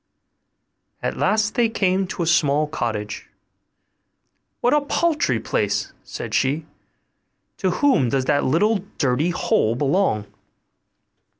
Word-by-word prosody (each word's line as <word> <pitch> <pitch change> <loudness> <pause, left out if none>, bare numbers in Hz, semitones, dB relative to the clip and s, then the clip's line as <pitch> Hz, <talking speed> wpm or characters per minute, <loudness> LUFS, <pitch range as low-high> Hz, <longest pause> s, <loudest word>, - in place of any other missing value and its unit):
At - - -1
last 215 0 +1
they 235 -2 +2
came 190 -3 +1
to 180 - -3
a - - -1
small 150 -2 +3
cottage. 110 -8 -4 1.3
'What 245 - +2
a 295 - +4
paltry 295 - +1
place!' 100 -1 -1
said - - -7
she; 145 +4 +1 0.9
'to 190 - 0
whom 180 - +2
does 130 +1 0
that 145 +1 +2
little 205 +11 +2 0.2
dirty 140 +4 +1
hole 115 -9 +1
belong? 140 - +1
155 Hz, 115 wpm, -22 LUFS, 130-210 Hz, 1.3 s, a